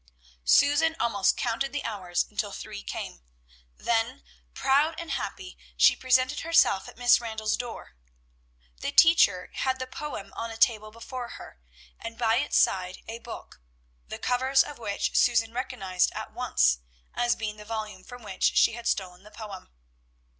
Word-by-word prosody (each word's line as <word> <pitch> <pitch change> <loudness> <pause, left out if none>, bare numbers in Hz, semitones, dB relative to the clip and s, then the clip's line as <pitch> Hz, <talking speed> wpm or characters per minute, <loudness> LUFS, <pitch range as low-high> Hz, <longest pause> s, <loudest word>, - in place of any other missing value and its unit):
Susan 290 - +4
almost 205 -5 +2
counted 270 +4 -1
the 290 - -3
hours 185 -5 -1
until - - -2
three - - -7
came; - - -6 0.6
then, 235 +4 -1 0.3
proud 285 +4 +2
and 335 -1 -6
happy, 370 -2 -5 0.2
she - - +6
presented 255 +2 +2
herself 330 -12 +3
at - - -15
Miss 245 0 +5
Randall's 220 -2 -1
door. 240 - -7 0.8
The - - -3
teacher 265 - +5
had 260 -1 -1
the 255 - -4
poem 255 -7 -7
on 230 - -4
a 225 - -8
table 215 -1 +2
before 240 +3 -7
her, - - -13 0.4
and 230 0 -7
by 230 -1 +2
its 290 +3 +1
side 185 -1 +1
a 230 +1 -6
book, 230 - -10 0.5
the - - -6
covers 260 +2 +2
of 290 - -10
which 205 -3 -2
Susan 225 -2 +3
recognized 235 -8 -1
at - - -7
once - - +2 0.3
as 240 0 +1
being 215 -1 -4
the 210 - -10
volume 215 -3 -5
from 245 +4 -11
which 195 -3 0
she - - +5
had 235 0 -6
stolen 180 -2 -2
the 210 - -15
poem. 210 -3 -9
230 Hz, 160 wpm, -27 LUFS, 210-260 Hz, 0.8 s, she